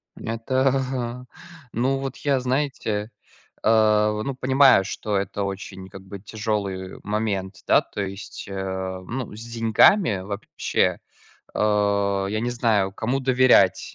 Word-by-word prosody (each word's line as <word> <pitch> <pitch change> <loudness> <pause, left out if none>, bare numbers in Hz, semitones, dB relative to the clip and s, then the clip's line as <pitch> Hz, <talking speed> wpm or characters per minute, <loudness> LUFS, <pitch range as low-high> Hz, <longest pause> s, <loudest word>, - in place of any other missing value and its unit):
Это 125 +4 -1
ага. 125 -2 -2 0.5
Ну 130 +4 0
вот 135 -1 -5
я, 140 -2 +1
знаете, 125 -5 -2 0.5
а, 105 -1 +4
в 105 0 -3
ну 135 +2 -3
понимаю, 130 -5 +5
что 105 +1 -2
это 100 +1 -3
очень, 95 -1 -6
как 95 0 -11
бы, 100 +1 -9
тяжелый 100 -2 -4
момент, 105 -2 -2
да, - - +5
то 105 - -6
есть, 100 0 -7
э, - - -6 0.5
ну 120 -3 -5
с 110 - -10
деньгами 115 - +3
вообще, 100 +2 -1 0.6
э, - - -4 0.7
я 110 +1 -1
не 120 +2 -1
знаю, 110 -5 +1
кому 120 +6 -1
доверять. 130 -1 +3
110 Hz, 135 wpm, -23 LUFS, 100-130 Hz, 0.7 s, понимаю